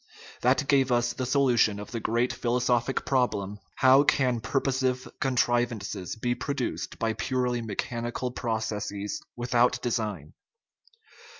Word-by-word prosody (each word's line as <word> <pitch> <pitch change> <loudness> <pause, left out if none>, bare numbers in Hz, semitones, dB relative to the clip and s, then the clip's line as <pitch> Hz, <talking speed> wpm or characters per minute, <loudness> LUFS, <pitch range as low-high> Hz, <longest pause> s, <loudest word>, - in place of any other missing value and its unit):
That 135 +3 +2
gave 135 -2 +3
us 120 0 +2
the 130 - -3
solu 130 -2 +2
tion 105 -1 +3
of 105 - -8
the 115 - -3
great 120 +3 0
philosophic 125 +1 0
problem: 105 -6 0
" - - -39
How 130 +2 +8
can 130 -4 +2
pur 135 - 0
posive 130 -1 0
contrivances 120 -7 0
be 120 +2 -1
produced 135 -1 -3
by 115 0 0
purely 125 +1 -1
mechanical 120 +3 -3
processes 110 -4 -3
without 120 +1 +2
design?" 105 -10 -2
120 Hz, 130 wpm, -27 LUFS, 110-130 Hz, -, How